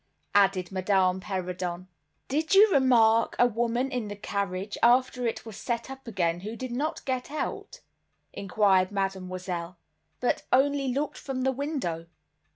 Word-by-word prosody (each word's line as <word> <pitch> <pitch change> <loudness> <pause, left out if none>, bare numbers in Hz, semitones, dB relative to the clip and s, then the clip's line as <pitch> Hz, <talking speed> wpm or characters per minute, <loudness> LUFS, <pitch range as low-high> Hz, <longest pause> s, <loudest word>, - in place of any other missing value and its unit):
added 195 -3 +3
Madame 185 -1 +2
Perrodon. 185 -2 -4 0.4
"Did 310 +7 +1
you 415 +1 +7
remark 230 -4 +4
a 245 - +5
woman 240 +3 0
in 245 -4 -2
the 205 - -6
carriage, 200 -1 -3
after 250 0 +3
it 230 - -4
was 220 -3 -8
set 235 +1 -3
up 270 -1 -10
again, 175 -6 0
who 215 +5 -6
did 255 0 -6
not 285 +6 -3
get 255 -2 -2
out," 305 - -5 0.5
inquired 195 -1 +2
Mademoiselle, 185 -3 -3 0.4
"but 245 - 0
only 275 +1 +3
looked 280 +3 -2
from 260 -2 -4
the 265 - +2
window?" 260 - -3
220 Hz, 145 wpm, -27 LUFS, 185-260 Hz, 0.5 s, you